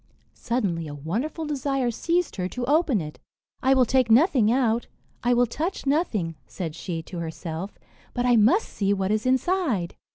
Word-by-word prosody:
Suddenly 195 Hz, -10 st, -2 dB
a 145 Hz, -, -7 dB
wonderful 230 Hz, -, -3 dB
desire 275 Hz, -4 st, -1 dB
seized 340 Hz, +6 st, -1 dB
her 180 Hz, -1 st, -1 dB
to 250 Hz, +3 st, -4 dB
open 290 Hz, -, +2 dB
it. 150 Hz, -1 st, -8 dB, 0.4 s
"I 265 Hz, +1 st, +4 dB
will 255 Hz, -1 st, +5 dB
take 255 Hz, 0 st, +2 dB
nothing 240 Hz, -, +5 dB
out, 240 Hz, -2 st, +1 dB, 0.4 s
I 245 Hz, +1 st, +3 dB
will 245 Hz, +1 st, +4 dB
touch 320 Hz, -, -3 dB
nothing," 270 Hz, -, 0 dB
said 165 Hz, -5 st, -5 dB
she 170 Hz, -2 st, -5 dB
to 175 Hz, +1 st, -7 dB
herself, 165 Hz, +3 st, -5 dB, 0.4 s
"but 245 Hz, -, 0 dB
I 245 Hz, -1 st, +5 dB
must 235 Hz, -, +4 dB
see 200 Hz, -1 st, 0 dB
what 195 Hz, 0 st, -1 dB
is 215 Hz, +3 st, 0 dB
inside." 260 Hz, -, +1 dB
240 Hz, 170 wpm, -25 LUFS, 190-275 Hz, 0.4 s, will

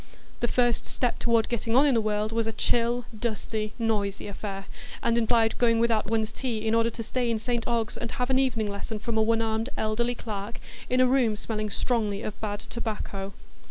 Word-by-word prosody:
The 240 Hz, -, +1 dB
first 240 Hz, -1 st, +2 dB
step 245 Hz, -2 st, -1 dB
toward 230 Hz, -1 st, +3 dB
getting 230 Hz, -1 st, -1 dB
on 270 Hz, +3 st, +7 dB
in 285 Hz, -, +4 dB
the 230 Hz, -, +3 dB
world 215 Hz, 0 st, 0 dB
was 225 Hz, 0 st, 0 dB
a -, -, 0 dB
chill, 240 Hz, +2 st, +1 dB
dusty, 215 Hz, -1 st, -2 dB
noisy 210 Hz, -4 st, 0 dB
affair, 195 Hz, -1 st, -5 dB, 0.4 s
and 235 Hz, 0 st, +3 dB
implied 225 Hz, -1 st, +3 dB
going 230 Hz, -2 st, +4 dB
without 225 Hz, -2 st, +2 dB
one's 220 Hz, -1 st, +1 dB
tea 225 Hz, -3 st, -3 dB
in 220 Hz, -, +2 dB
order 230 Hz, 0 st, +4 dB
to 230 Hz, 0 st, -6 dB
stay 245 Hz, +1 st, -1 dB
in 230 Hz, -, +1 dB
St 235 Hz, +1 st, -2 dB
Ogg's 230 Hz, -2 st, 0 dB
and 235 Hz, -, -4 dB
have 250 Hz, +1 st, -1 dB
an 260 Hz, -, +4 dB
evening 235 Hz, -5 st, +1 dB
lesson 205 Hz, +2 st, -4 dB
from 220 Hz, +2 st, -3 dB
a 220 Hz, -, +4 dB
one 225 Hz, +1 st, +3 dB
armed 225 Hz, +2 st, -1 dB
elderly 235 Hz, +3 st, +1 dB
clerk, 210 Hz, -1 st, -5 dB, 0.3 s
in 255 Hz, +1 st, +4 dB
a -, -, +7 dB
room 250 Hz, -4 st, +3 dB
smelling 215 Hz, 0 st, -3 dB
strongly 210 Hz, -2 st, 0 dB
of 210 Hz, -, -5 dB
bad 205 Hz, -1 st, -2 dB
tobacco. 205 Hz, -4 st, -4 dB
225 Hz, 205 wpm, -27 LUFS, 215-235 Hz, 0.4 s, on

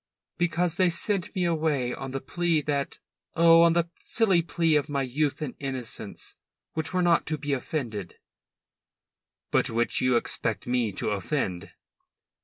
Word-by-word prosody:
"Because 175 Hz, 0 st, +1 dB
they 185 Hz, -2 st, +4 dB
sent 185 Hz, +2 st, -2 dB
me 180 Hz, -2 st, +1 dB
away 155 Hz, -7 st, 0 dB
on 135 Hz, -, -6 dB
the 135 Hz, +1 st, -3 dB
plea 170 Hz, +4 st, 0 dB
that 140 Hz, -1 st, -2 dB, 0.4 s
oh, 165 Hz, 0 st, +7 dB
on 170 Hz, 0 st, +6 dB
the 170 Hz, 0 st, +1 dB
silly 195 Hz, -7 st, +2 dB
plea 165 Hz, -1 st, +1 dB
of 150 Hz, +1 st, +1 dB
my 140 Hz, -1 st, 0 dB
youth 145 Hz, +4 st, -1 dB
and 135 Hz, -, -4 dB
innocence, 130 Hz, -4 st, -5 dB, 0.4 s
which 160 Hz, 0 st, -2 dB
were 185 Hz, -1 st, +1 dB
not 170 Hz, -1 st, +3 dB
to 155 Hz, -, -1 dB
be 145 Hz, 0 st, -2 dB
offended." 120 Hz, -, -4 dB, 1.4 s
"But -, -, +2 dB
which 115 Hz, +1 st, +1 dB
you 125 Hz, -1 st, +3 dB
expect 115 Hz, -2 st, -1 dB
me 120 Hz, -3 st, 0 dB
to 95 Hz, -, -2 dB
offend?" 95 Hz, -, -2 dB
150 Hz, 155 wpm, -27 LUFS, 130-170 Hz, 1.4 s, oh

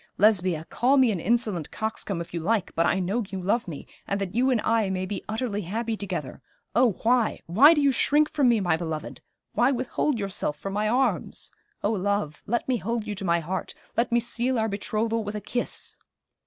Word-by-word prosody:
Lesbia, 185 Hz, -6 st, +3 dB
call 265 Hz, +4 st, +2 dB
me 255 Hz, -4 st, +5 dB
an 190 Hz, -, -2 dB
insolent 210 Hz, -5 st, 0 dB
coxcomb 215 Hz, -4 st, -3 dB
if 170 Hz, -, -9 dB
you 170 Hz, -, -2 dB
like, 195 Hz, +3 st, 0 dB
but 165 Hz, +1 st, +2 dB
I 190 Hz, -, +2 dB
know 195 Hz, +6 st, 0 dB
you 190 Hz, -, -4 dB
love 200 Hz, +5 st, 0 dB
me, 155 Hz, -5 st, -7 dB, 0.2 s
and 200 Hz, -, -1 dB
that 195 Hz, -2 st, -3 dB
you 250 Hz, +3 st, +2 dB
and 250 Hz, -3 st, +3 dB
I 225 Hz, -3 st, +2 dB
may 185 Hz, 0 st, -1 dB
be 200 Hz, +2 st, -5 dB
utterly 220 Hz, -2 st, -2 dB
happy 220 Hz, +5 st, -2 dB
together. 180 Hz, -11 st, -5 dB, 0.3 s
Oh, 240 Hz, -3 st, +4 dB
why 235 Hz, -1 st, +2 dB
why 270 Hz, -, +7 dB
do 295 Hz, -, +2 dB
you 280 Hz, -1 st, +4 dB
shrink 295 Hz, +4 st, +3 dB
from 285 Hz, -5 st, +2 dB
me, 235 Hz, -2 st, +4 dB
my 175 Hz, -3 st, +2 dB
beloved; 160 Hz, -2 st, -5 dB, 0.3 s
why 245 Hz, +3 st, +3 dB
withhold 255 Hz, +1 st, -1 dB
yourself 195 Hz, -7 st, -2 dB
from 195 Hz, +5 st, -5 dB
my 210 Hz, +1 st, +1 dB
arms! 260 Hz, +3 st, 0 dB, 0.3 s
Oh, 205 Hz, -, +2 dB
love, 200 Hz, -6 st, -1 dB
let 235 Hz, +2 st, -1 dB
me 255 Hz, -2 st, +2 dB
hold 230 Hz, +1 st, -2 dB
you 210 Hz, -, -3 dB
to 200 Hz, 0 st, -6 dB
my 170 Hz, -1 st, +2 dB
heart 185 Hz, +4 st, -4 dB, 0.2 s
let 235 Hz, +1 st, +1 dB
me 235 Hz, -, +4 dB
seal 240 Hz, +2 st, -1 dB
our 220 Hz, 0 st, +1 dB
betrothal 220 Hz, +2 st, -1 dB
with 205 Hz, 0 st, -5 dB
a -, -, -2 dB
kiss!' 240 Hz, +4 st, -2 dB
215 Hz, 210 wpm, -26 LUFS, 185-240 Hz, 0.3 s, why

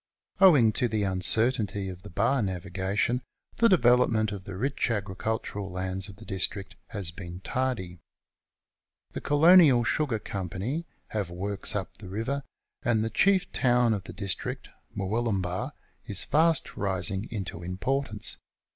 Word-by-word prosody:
Owing 150 Hz, -, +7 dB
to 120 Hz, -, +1 dB
the 110 Hz, -2 st, -1 dB
uncertainty 100 Hz, +1 st, +1 dB
of 90 Hz, -1 st, -7 dB
the 105 Hz, -, -10 dB
bar 115 Hz, +9 st, +1 dB
navigation 95 Hz, +5 st, -1 dB, 0.4 s
the 230 Hz, -, +5 dB
development 120 Hz, -, +4 dB
of 100 Hz, -2 st, -7 dB
the 95 Hz, -, -7 dB
rich 135 Hz, +4 st, 0 dB
agricul 105 Hz, +1 st, -2 dB
tural 100 Hz, -1 st, -5 dB
lands 95 Hz, +1 st, -2 dB
of 95 Hz, -, -11 dB
the 110 Hz, +2 st, -13 dB
district 95 Hz, 0 st, -2 dB
has 100 Hz, -5 st, -4 dB
been 90 Hz, 0 st, -8 dB
tardy. 95 Hz, -9 st, -2 dB, 1.1 s
The -, -, -6 dB
Colonial 145 Hz, -4 st, +6 dB
Sugar 130 Hz, -1 st, 0 dB
Company 100 Hz, -, -4 dB, 0.2 s
have 105 Hz, -5 st, -2 dB
works 100 Hz, +4 st, -3 dB
up 95 Hz, -2 st, -4 dB
the 95 Hz, -3 st, -9 dB
river, 115 Hz, +8 st, -2 dB, 0.4 s
and 115 Hz, -5 st, +2 dB
the 115 Hz, -, -3 dB
chief 195 Hz, -, +3 dB
town 120 Hz, -2 st, +3 dB
of 100 Hz, -2 st, -4 dB
the -, -, -8 dB
district, 95 Hz, -1 st, -3 dB, 0.3 s
Murwillumbah, 100 Hz, +3 st, -1 dB, 0.3 s
is 100 Hz, -2 st, +2 dB
fast 160 Hz, 0 st, +2 dB
rising 95 Hz, +1 st, -1 dB
into 95 Hz, -6 st, -5 dB
importance. 105 Hz, +5 st, -2 dB
105 Hz, 140 wpm, -28 LUFS, 95-125 Hz, 1.1 s, Owing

